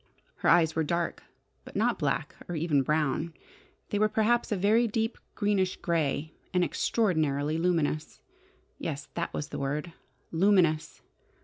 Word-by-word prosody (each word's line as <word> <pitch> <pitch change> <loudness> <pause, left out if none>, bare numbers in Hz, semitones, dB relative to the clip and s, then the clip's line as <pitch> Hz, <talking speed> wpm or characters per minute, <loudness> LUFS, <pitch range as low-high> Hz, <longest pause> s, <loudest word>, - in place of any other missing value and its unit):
Her - - +1
eyes 165 -2 +5
were 160 - +2
dark, 170 +2 -1 0.4
but - - -13
not - - +1
black - - -1
or 175 - -2
even 155 -3 +2
brown. 150 +3 0 0.5
They 205 - 0
were 215 0 +4
perhaps 225 +3 +2
a 210 - +1
very 215 +5 +3
deep, 225 +1 -1 0.2
greenish 200 -3 +1
grey, 155 -2 -1 0.2
and 180 - +4
extraordinarily 155 -7 +1
luminous. 165 -3 0 0.6
Yes, 145 -2 -4
that 170 - -2
was 145 - -4
the - - -5
word: 150 +5 -2 0.4
luminous! 170 -3 +2
170 Hz, 140 wpm, -29 LUFS, 155-200 Hz, 0.6 s, eyes